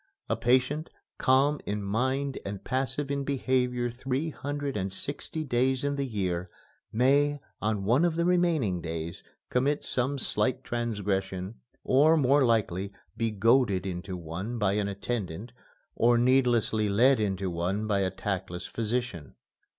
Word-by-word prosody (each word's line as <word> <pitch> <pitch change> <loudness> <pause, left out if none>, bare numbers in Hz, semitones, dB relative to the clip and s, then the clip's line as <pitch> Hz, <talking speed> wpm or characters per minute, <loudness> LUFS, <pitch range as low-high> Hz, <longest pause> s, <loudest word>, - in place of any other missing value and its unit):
A - - +2
patient, 130 +6 +1 0.3
calm 140 +3 +3
in 105 0 -2
mind 130 +7 -1
and 100 -1 -6
passive 135 +2 -1
in 140 0 -1
behavior 125 -3 0
three 130 +6 -2
hundred 145 -1 -4
and 95 -1 -2
sixty 145 +8 -5
days 130 -1 +1
in 145 0 0
the 140 -1 -2
year, 90 -5 -2 0.4
may, 140 +5 +3 0.2
on 105 -2 0
one 120 - +3
of 170 -2 +2
the 170 0 +1
remaining 165 - +2
days, 80 0 -5 0.3
commit 140 +4 +1
some 130 +3 0
slight 130 -1 -1
transgression, 100 -4 -2 0.2
or, 150 +5 +5
more 140 0 +4
likely, 100 -5 +1 0.2
be 115 -1 0
goaded 105 -2 +3
into 90 0 -4
one 90 +8 -5
by 105 -3 +2
an 105 -1 0
attendant 100 0 -4 0.4
or 120 +1 +4
needlessly 120 -4 +3
led 125 +6 +4
into 95 -3 -1
one 90 +5 -1
by 105 -2 +1
a 95 -1 +1
tactless 95 -2 -4
physician. 115 - -3
120 Hz, 145 wpm, -28 LUFS, 100-135 Hz, 0.4 s, or